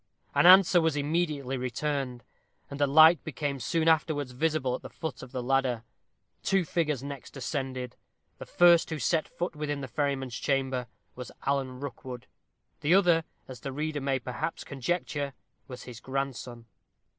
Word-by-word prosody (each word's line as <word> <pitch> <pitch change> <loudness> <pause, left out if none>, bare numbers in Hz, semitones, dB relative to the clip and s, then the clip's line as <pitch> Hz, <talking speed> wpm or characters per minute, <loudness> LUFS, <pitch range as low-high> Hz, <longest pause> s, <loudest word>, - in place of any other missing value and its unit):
An - - +5
answer 185 -1 +8
was 160 -2 +1
immediately 145 -3 -1
returned, 130 0 -3 0.5
and 140 +1 -5
a 145 - +4
light 160 +4 +7
became 145 -2 -3
soon 165 +6 0
afterwards 150 -4 +2
visible 150 -1 0
at - - -4
the - - -9
foot 160 -6 -6
of 125 - -10
the 130 -2 -4
ladder. 130 -3 +1 0.6
Two 195 -2 +1
figures 150 -6 -1
next 140 0 -8
ascended; 130 -2 -4 0.4
the - - -8
first 175 -1 +5
who 155 - -3
set 160 +1 +1
foot 175 -2 -4
within 145 -1 -3
the 135 - -5
ferryman's 135 -3 -2
chamber 130 -3 -1 0.3
was 125 -1 -8
Alan 135 -2 -1
Rookwood: 130 -3 -7 0.5
the 160 +5 +3
other, 175 -4 +4 0.2
as 130 -2 -9
the 135 - -5
reader 150 +1 -3
may 135 -1 +1
perhaps 130 +6 -4
conjecture, 140 0 -2 0.3
was 125 -2 -9
his 120 -2 -9
grandson. 130 -3 -4
140 Hz, 155 wpm, -28 LUFS, 130-155 Hz, 0.6 s, answer